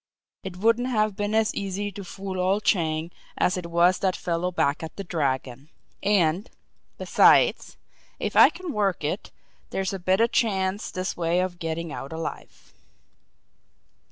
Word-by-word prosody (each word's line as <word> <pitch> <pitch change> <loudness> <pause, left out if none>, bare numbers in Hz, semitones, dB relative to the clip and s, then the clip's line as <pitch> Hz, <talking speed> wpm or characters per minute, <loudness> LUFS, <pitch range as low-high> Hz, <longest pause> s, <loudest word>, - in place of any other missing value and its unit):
"It 190 -2 -7
wouldn't 230 +5 +2
have 215 -4 +1
been 205 +1 -2
as 220 -1 +2
easy 200 +1 -3
to 200 +1 -8
fool 190 0 -6
old 190 +3 +1
Chang 160 -3 0 0.3
as 180 - +2
it 180 -2 -5
was 175 +2 +3
that 190 -2 +1
fellow 175 0 -2
back 145 -4 0
at 160 - -7
the 200 - -5
Dragon 135 -5 -2 0.3
and, 195 -1 +2 0.5
besides, - - +4 0.4
if - - -3
I - - +9
can 365 -4 -7
work 200 -6 0
it, 155 +7 -3 0.4
there's 190 0 -2
a 195 - -4
better 190 +5 +3
chance 200 -5 0
this 185 0 -3
way 170 +1 0
of 180 -1 -2
getting 165 -1 -4
out 135 - -7
alive." 160 0 -7
185 Hz, 155 wpm, -25 LUFS, 170-205 Hz, 0.5 s, I